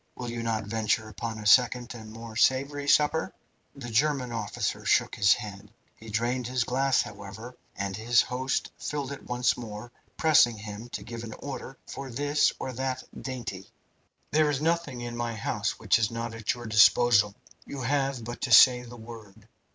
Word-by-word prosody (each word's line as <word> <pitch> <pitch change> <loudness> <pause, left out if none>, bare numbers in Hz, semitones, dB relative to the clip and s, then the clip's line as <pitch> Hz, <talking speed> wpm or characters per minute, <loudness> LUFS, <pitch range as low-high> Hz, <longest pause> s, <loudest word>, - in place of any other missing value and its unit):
Will 120 -1 -5
you 120 0 -4
not 115 -1 -1
venture 110 +1 -1
upon 110 +2 -5
a 105 - -8
second 125 +2 +4
and 110 -2 -10
more 115 0 -9
savoury 140 +4 +1
supper?" 150 +2 +3 0.4
The 120 -4 -8
German 135 +1 +1
officer 110 -3 -3
shook - - +2
his 100 0 +4
head. 105 -2 -9 0.2
He 110 - -12
drained 120 +3 -1
the 130 0 -3
glass, 135 0 +2
however, 105 +4 -9 0.2
and 100 -1 -3
his 115 +3 +3
host 130 +1 -2
filled 140 -2 -4
it 140 - -9
once 125 0 +1
more, 115 0 -8 0.3
pressing 155 -8 +5
him 105 +3 -8
to 105 - -6
give 115 +1 -7
an 110 -1 -7
order 135 -1 -7
for 135 -1 -7
this 145 +4 +2
or 130 - -5
that 130 +1 -3 0.2
dainty. 120 -8 -6 0.6
"There 155 0 +3
is 145 -2 0
nothing 160 -5 -1
in 120 0 -5
my 120 -1 -3
house 110 - -2
which - - +2
is 110 -2 +1
not 115 0 -4
at 115 0 -2
your 120 -1 -9
disposal. 110 -1 +5 0.3
You 140 - -6
have 135 -1 0
but 120 +1 -7
to 125 - -2
say 125 +2 +8
the 120 0 -11
word. 110 -3 -12
120 Hz, 180 wpm, -27 LUFS, 110-130 Hz, 0.6 s, say